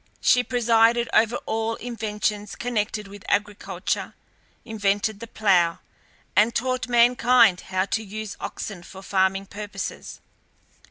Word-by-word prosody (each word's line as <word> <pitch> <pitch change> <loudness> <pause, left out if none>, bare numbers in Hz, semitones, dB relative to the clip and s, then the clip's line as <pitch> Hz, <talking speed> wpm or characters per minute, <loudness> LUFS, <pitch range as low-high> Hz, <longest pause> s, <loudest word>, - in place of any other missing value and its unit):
She 250 - +4
presided 235 -1 +3
over 225 +2 +4
all 225 +1 -1
inventions 210 -3 -3
connected 215 -3 -2
with 200 0 -12
agriculture, 200 -2 -2 0.5
invented 205 -1 -1
the 230 - -8
plough, 180 -7 +2 0.6
and 220 +3 +4
taught 255 0 -1
mankind 240 -4 +5
how 185 0 0
to 220 +2 -2
use 215 0 -6
oxen 195 -5 -6
for 190 +2 -12
farming 195 0 +1
purposes. 205 +1 -7
215 Hz, 115 wpm, -24 LUFS, 200-230 Hz, 0.6 s, mankind